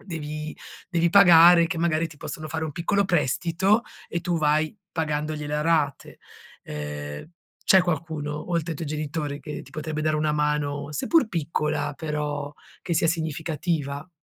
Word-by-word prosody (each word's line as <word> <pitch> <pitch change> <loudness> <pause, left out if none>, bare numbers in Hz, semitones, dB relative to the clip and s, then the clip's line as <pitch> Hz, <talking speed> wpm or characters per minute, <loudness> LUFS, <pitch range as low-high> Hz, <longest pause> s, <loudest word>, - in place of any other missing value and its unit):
devi 155 -4 -5 0.3
devi 170 -2 +2
pagare, 175 -3 +8
che 165 - -4
magari 165 -1 +1
ti 155 - -14
possono 155 +2 -6
fare 160 +1 -3
un 155 - -3
piccolo 200 +6 +1
prestito 175 - +2 0.3
e 170 - -2
tu 175 0 -1
vai 155 +2 +1 0.2
pagandogliele 150 -2 -2
a - - 0
rate. 155 -4 0 0.5
Ehm, 75 - -6 0.4
c'è 190 -1 +6
qualcuno, 155 -3 -3
oltre 170 -1 0
ai 160 - -3
tuoi 160 0 -5
genitori, 150 -1 -3
che 150 0 -6
ti - - -16
potrebbe 155 0 -4
dare 155 0 +1
una 155 0 +1
mano, 150 -1 -1
seppur 320 - +3
piccola, 150 -4 -1
però 150 -2 -3 0.3
che 170 - -2
sia 165 +1 +2
significativa? 160 -2 -2
155 Hz, 150 wpm, -25 LUFS, 150-170 Hz, 0.5 s, pagare